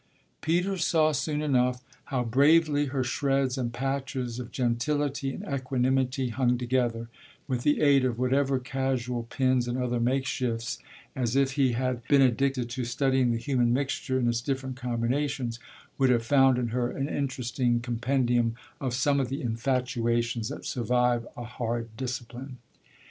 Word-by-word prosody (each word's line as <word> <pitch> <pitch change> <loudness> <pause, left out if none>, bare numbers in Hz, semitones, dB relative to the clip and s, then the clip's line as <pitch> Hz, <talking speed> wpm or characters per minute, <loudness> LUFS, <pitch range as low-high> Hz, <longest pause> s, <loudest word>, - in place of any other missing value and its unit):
Peter 180 +4 +1
saw 160 -2 +3
soon 150 0 -1
enough 125 -3 +1 0.2
how 130 -3 -1
bravely 145 +4 +4
her 130 -1 -1
shreds 135 +2 0
and 125 -3 -2
patches 130 -1 -3
of 125 -1 -7
gentility 135 +3 0
and - - -7
equanimity 130 -1 0
hung 125 +1 +1
together, 120 -2 -1 0.4
with 125 -3 -1
the 150 +3 +2
aid 140 -3 +5
of 125 -3 0
whatever 135 +2 +2
casual 130 -2 -2
pins 130 +1 0
and 120 +1 -2
other 125 -1 -1
makeshifts, 120 -2 -1 0.4
and 125 -2 -1
if 135 -1 +3
he 135 -3 +2
had 125 0 -1
been 140 -2 +5
addicted 130 0 +1
to 120 +1 -4
studying 130 +1 +1
the 115 - 0
human 120 -1 +1
mixture 130 0 -1
in 125 -2 +1
its 120 0 +1
different 130 0 -3
combinations 125 0 -2 0.4
would 135 -1 +4
have 120 -2 +2
found 135 -1 +5
in 120 -2 -1
her 120 +1 0
an 135 +2 -3
interesting 125 -4 -1
compendium 120 -1 0 0.2
of 130 -3 -2
some 140 +2 +2
of 130 -2 -1
the 135 +1 -4
infatuations 120 -1 0
that - - -7
survive 125 -1 +1
a 120 - -5
hard 115 -1 -4
discipline. 125 +1 -6
125 Hz, 155 wpm, -27 LUFS, 120-135 Hz, 0.4 s, aid